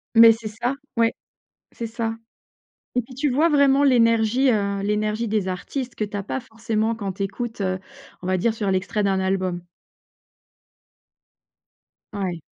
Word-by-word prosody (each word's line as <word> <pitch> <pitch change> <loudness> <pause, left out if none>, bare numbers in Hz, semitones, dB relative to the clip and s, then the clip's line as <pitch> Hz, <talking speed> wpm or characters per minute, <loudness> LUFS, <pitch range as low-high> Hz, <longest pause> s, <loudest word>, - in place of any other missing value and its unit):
Mais 230 0 +10
c'est 225 -1 -3
ça, 235 +5 -2 0.2
ouais, 230 0 +3 0.6
c'est 230 - -5
ça 225 0 -3 0.8
et 250 - +3
puis 250 +2 -14
tu 280 +3 0
vois, 300 +6 +3
vraiment, 280 -2 +4
l'énergie, 235 +1 +4
heu, 200 -2 0
l'énergie 210 +2 0
des 210 -3 0
artistes 245 +8 -4
que 215 - -2
tu 205 0 -4
as 200 - -3
pas 260 +5 -3
forcément 225 -1 -1
quand 200 -4 -4
tu 195 +2 -3
écoutes, 225 +2 -4
heu, 185 -1 -1 0.4
on 180 - -5
va 185 - +2
dire 225 +5 +1
sur 210 -3 -2
l'extrait 190 +3 0
d'un 195 -1 +1
album. 185 -2 -1 2.5
Ouais. 185 -5 -3
220 Hz, 160 wpm, -23 LUFS, 195-235 Hz, 2.5 s, Mais